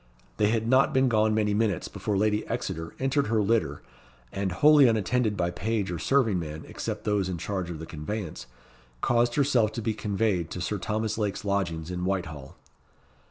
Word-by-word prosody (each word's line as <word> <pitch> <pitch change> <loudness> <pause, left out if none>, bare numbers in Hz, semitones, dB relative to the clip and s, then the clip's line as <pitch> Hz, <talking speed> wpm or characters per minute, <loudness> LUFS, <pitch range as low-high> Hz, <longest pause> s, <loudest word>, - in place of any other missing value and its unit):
They 105 - +3
had 110 +1 0
not 130 +4 +4
been 130 -1 +4
gone 110 -1 +2
many 105 -1 +1
minutes 105 -4 0
before 105 -2 -2
Lady 105 +1 +1
Exeter 80 +1 -4
entered 135 0 +1
her 110 0 +1
litter, 100 -9 0 0.5
and 100 -1 -2
wholly 145 - +6
unattended 110 0 +1
by 85 -1 0
page 105 +1 -2
or 85 - -3
serving 115 - +2
man, 80 -1 -6
except - - -5
those 100 -3 0
in 90 - -3
charge 95 +1 -3
of 85 - -5
the 80 - -7
conveyance, 80 +4 -5 0.5
caused 120 0 +2
herself 130 -7 +3
to 115 - -4
be 110 0 0
conveyed 100 -5 -1
to - - -5
Sir 100 +3 -2
Thomas 110 +3 -2
Lake's 105 -1 -2
lodgings 90 -5 -1
in 90 0 -3
Whitehall. 85 -8 -3
105 Hz, 180 wpm, -27 LUFS, 90-115 Hz, 0.5 s, wholly